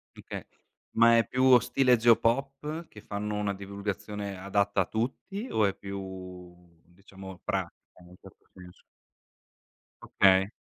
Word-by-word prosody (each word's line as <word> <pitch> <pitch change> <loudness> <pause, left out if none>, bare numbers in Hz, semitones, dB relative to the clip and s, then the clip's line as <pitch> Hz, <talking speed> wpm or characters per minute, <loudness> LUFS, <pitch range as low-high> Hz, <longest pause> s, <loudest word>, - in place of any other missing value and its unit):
Mh, - - -15
okay - - -6 0.5
ma 115 0 +6
è 115 - +2
più 130 0 +5
stile 130 0 +3
Geopop, 135 +7 +1
che 105 - -14
fanno 105 0 -4
una 105 -1 -1
divulgazione 100 +1 -5
adatta 100 +1 +1
a - - 0
tutti 135 - -4
o 110 - +2
è 100 -1 0
più, 95 -2 -8 0.3
diciamo, 95 +1 -12
pratica, - - -2 0.3
in 90 - -16
un 90 - -15
certo - - -18
senso? 90 -1 -15 1.2
Okay. 95 0 +4
100 Hz, 135 wpm, -28 LUFS, 95-115 Hz, 1.2 s, ma